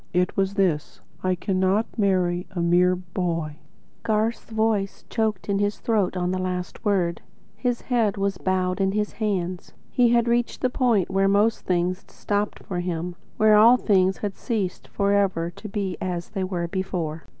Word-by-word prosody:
It 180 Hz, 0 st, +1 dB
was 195 Hz, 0 st, 0 dB
this: 175 Hz, -7 st, 0 dB, 0.2 s
'I 185 Hz, 0 st, +1 dB
cannot 190 Hz, +4 st, +1 dB
marry 180 Hz, -4 st, +1 dB
a 190 Hz, -3 st, -6 dB
mere 175 Hz, +2 st, +4 dB
boy.'" 170 Hz, -4 st, -3 dB, 0.4 s
Garth's 220 Hz, +1 st, 0 dB
voice 220 Hz, -3 st, 0 dB
choked 220 Hz, -4 st, -1 dB
in 200 Hz, -1 st, +1 dB
his 205 Hz, 0 st, 0 dB
throat 205 Hz, -5 st, 0 dB
on 180 Hz, 0 st, 0 dB
the 185 Hz, -, -1 dB
last 180 Hz, +1 st, -4 dB
word. 180 Hz, -6 st, +1 dB, 0.3 s
His 245 Hz, -2 st, -1 dB
head 230 Hz, -6 st, +1 dB
was 195 Hz, -1 st, -1 dB
bowed 185 Hz, 0 st, 0 dB
in 195 Hz, 0 st, +1 dB
his 210 Hz, 0 st, 0 dB
hands. 185 Hz, -5 st, -3 dB, 0.2 s
He 245 Hz, -2 st, +4 dB
had 235 Hz, 0 st, +3 dB
reached 235 Hz, 0 st, 0 dB
the 255 Hz, -, +1 dB
point 230 Hz, -9 st, +2 dB
where 195 Hz, +1 st, +3 dB
most 205 Hz, +3 st, +2 dB
things 180 Hz, +1 st, 0 dB
stopped 205 Hz, 0 st, -2 dB
for 180 Hz, -2 st, -4 dB
him; 175 Hz, 0 st, -3 dB, 0.2 s
where 215 Hz, 0 st, +5 dB
all 230 Hz, +4 st, +7 dB
things 190 Hz, -5 st, +2 dB
had 205 Hz, -2 st, -4 dB
ceased 210 Hz, -7 st, -3 dB
forever 200 Hz, -4 st, +1 dB
to 215 Hz, +5 st, -9 dB
be 195 Hz, -3 st, -3 dB
as 175 Hz, -2 st, -3 dB
they 195 Hz, -3 st, -3 dB
were 180 Hz, -2 st, -2 dB
before. 170 Hz, -4 st, -3 dB
190 Hz, 170 wpm, -24 LUFS, 180-210 Hz, 0.4 s, all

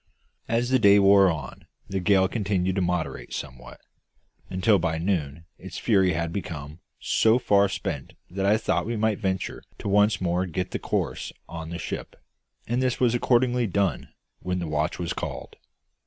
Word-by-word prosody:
As 120 Hz, +2 st, 0 dB
the 130 Hz, -, +4 dB
day 100 Hz, -2 st, +6 dB
wore 100 Hz, -1 st, +6 dB
on 75 Hz, -6 st, -6 dB, 0.2 s
the 95 Hz, -, -2 dB
gale 95 Hz, +1 st, +3 dB
continued 95 Hz, -3 st, -1 dB
to -, -, +2 dB
moderate 80 Hz, -9 st, -2 dB
somewhat, 65 Hz, 0 st, -8 dB, 0.7 s
until 95 Hz, +2 st, +3 dB
by 80 Hz, -1 st, -1 dB
noon 80 Hz, -3 st, -2 dB
its 95 Hz, -2 st, -8 dB
fury 95 Hz, -6 st, +3 dB
had 85 Hz, +1 st, -2 dB
become 80 Hz, -5 st, -6 dB, 0.2 s
so 110 Hz, +1 st, +3 dB
far 100 Hz, -4 st, +3 dB
spent -, -, -4 dB
that 95 Hz, +2 st, -4 dB
I 105 Hz, +2 st, +4 dB
thought 110 Hz, -, -1 dB
we 115 Hz, 0 st, -2 dB
might 110 Hz, -1 st, +1 dB
venture 95 Hz, -3 st, -2 dB, 0.2 s
to -, -, -6 dB
once 105 Hz, +2 st, +3 dB
more 90 Hz, +1 st, 0 dB
get 90 Hz, +2 st, -3 dB
the -, -, -3 dB
courses -, -, -2 dB
on 80 Hz, -1 st, -7 dB
the 85 Hz, -, -5 dB
ship; -, -, -6 dB, 0.5 s
and 120 Hz, +2 st, -1 dB
this 130 Hz, -1 st, 0 dB
was 120 Hz, -2 st, +3 dB
accordingly 120 Hz, 0 st, +2 dB
done 95 Hz, -6 st, -1 dB, 0.3 s
when 90 Hz, 0 st, -2 dB
the 90 Hz, -, -3 dB
watch 75 Hz, +1 st, -1 dB
was 85 Hz, -1 st, -3 dB
called. -, -, -6 dB
95 Hz, 170 wpm, -25 LUFS, 85-105 Hz, 0.7 s, day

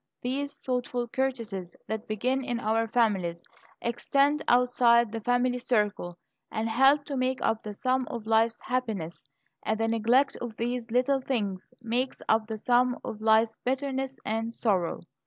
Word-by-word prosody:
These 280 Hz, +3 st, -3 dB
thoughtful 245 Hz, -1 st, -1 dB
courtesies 230 Hz, -9 st, -3 dB
that 220 Hz, 0 st, -4 dB
begin 255 Hz, +5 st, 0 dB
in 245 Hz, -2 st, -2 dB
our 225 Hz, 0 st, +1 dB
families, 195 Hz, -8 st, +1 dB, 0.4 s
extend 275 Hz, +5 st, +1 dB
outside 240 Hz, -2 st, +4 dB
the 225 Hz, 0 st, -4 dB
family 245 Hz, +2 st, +1 dB
circle, 210 Hz, -7 st, 0 dB, 0.3 s
and 225 Hz, 0 st, -1 dB
help 270 Hz, +5 st, +4 dB
to 280 Hz, -, -4 dB
make 260 Hz, 0 st, 0 dB
up 225 Hz, 0 st, +1 dB
the 210 Hz, -1 st, -7 dB
sum 255 Hz, +2 st, 0 dB
of 235 Hz, -3 st, -6 dB
life's 225 Hz, +1 st, +2 dB
happiness; 215 Hz, -, -3 dB, 0.3 s
and 220 Hz, 0 st, -1 dB
the 225 Hz, -, +1 dB
neglect 230 Hz, +5 st, +2 dB
of 235 Hz, -3 st, -6 dB
these 240 Hz, +1 st, -3 dB
little 255 Hz, +3 st, +2 dB
things 205 Hz, -8 st, -3 dB
makes 245 Hz, +3 st, -1 dB
up 220 Hz, 0 st, +2 dB
the 220 Hz, -1 st, -4 dB
sum 245 Hz, +2 st, +2 dB
of 215 Hz, -, -6 dB
life's 220 Hz, 0 st, +3 dB
bitterness 265 Hz, 0 st, -2 dB
and 225 Hz, +1 st, -2 dB
sorrow." 190 Hz, -7 st, 0 dB
235 Hz, 155 wpm, -28 LUFS, 220-255 Hz, 0.4 s, outside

